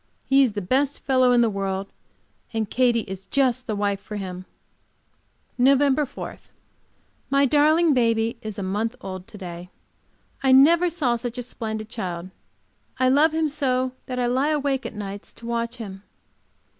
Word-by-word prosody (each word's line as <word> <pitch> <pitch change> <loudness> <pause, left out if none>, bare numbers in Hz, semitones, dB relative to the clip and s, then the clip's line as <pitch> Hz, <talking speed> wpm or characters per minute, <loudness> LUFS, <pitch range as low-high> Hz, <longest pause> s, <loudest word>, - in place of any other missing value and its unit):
He 270 0 +4
is 250 -6 +3
the 205 -2 -4
best 270 +8 0
fellow 255 -2 +3
in 245 -1 +5
the 235 - +4
world, 195 -1 -2 0.7
and 220 -1 0
Katy 240 0 +2
is 195 -2 -8
just 255 0 +1
the 215 - -1
wife 200 -1 0
for 210 - -8
him. 185 -2 -6 1.1
Nov. 275 +2 +4
4. - - -7 0.9
My 275 0 +4
darling 305 +4 +4
baby 230 -2 +2
is 215 -3 -6
a 200 - -3
month 210 +5 -2
old 185 -1 -7
to 210 - -12
day. 175 -2 -8 0.7
I 265 -1 +4
never 335 +7 +6
saw 280 -8 0
such 240 +1 -5
a 245 - -3
splendid 220 -3 -5
child. 185 -6 -5 0.7
I 255 0 +3
love 295 +4 +5
him 320 0 +1
so 260 -4 0 0.2
that 255 - -4
I 250 - +1
lie 260 +5 +1
awake 280 -3 -1
nights 200 -2 -7
to 230 - -13
watch 235 0 -2
him. 195 -5 -8
240 Hz, 165 wpm, -24 LUFS, 205-270 Hz, 1.1 s, never